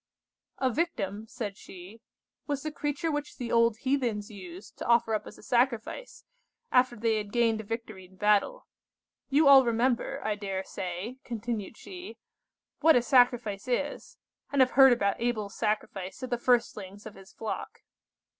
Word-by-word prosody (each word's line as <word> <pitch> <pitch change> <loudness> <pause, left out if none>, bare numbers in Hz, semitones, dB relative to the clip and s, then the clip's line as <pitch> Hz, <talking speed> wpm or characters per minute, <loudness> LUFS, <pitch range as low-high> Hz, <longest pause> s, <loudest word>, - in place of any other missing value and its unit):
"A 260 -1 +1
victim," 220 - -2
said 215 -4 -5
she, 190 +4 -12 0.5
"was 285 -2 -2
the 310 - -3
creature 295 +2 -2
which 295 0 -4
the 245 -3 -4
old 230 -1 +3
heathens 245 -7 -1
used 185 -1 -11
to - - -5
offer 235 -1 +3
up 215 -1 -2
as - - -11
a - - -16
sacrifice, 245 - -1 0.5
after 250 -1 +4
they 225 0 +1
had 210 -1 -4
gained 230 -2 +2
a - - -11
victory 220 -3 -6
in 185 +1 -20
battle. 210 - +2 0.6
You 285 +2 +4
all 275 -1 +9
remember 245 +3 0
I 215 - +1
dare 195 -2 -3
say," 190 +7 -6
continued 230 -2 -4
she, 365 +1 -10 0.6
"what 320 0 +6
a 245 - +4
sacrifice 245 -5 +3
is, 285 +4 -3 0.3
and 285 - 0
have 255 - +4
heard 265 -1 +8
about 200 -4 +1
Abel's 220 -4 -1
sacrifice 210 -2 -3
of 255 - -5
the 240 - 0
firstlings 215 -5 0
of - - -8
his 195 -1 -15
flock." 220 - -6
230 Hz, 165 wpm, -29 LUFS, 205-260 Hz, 0.6 s, all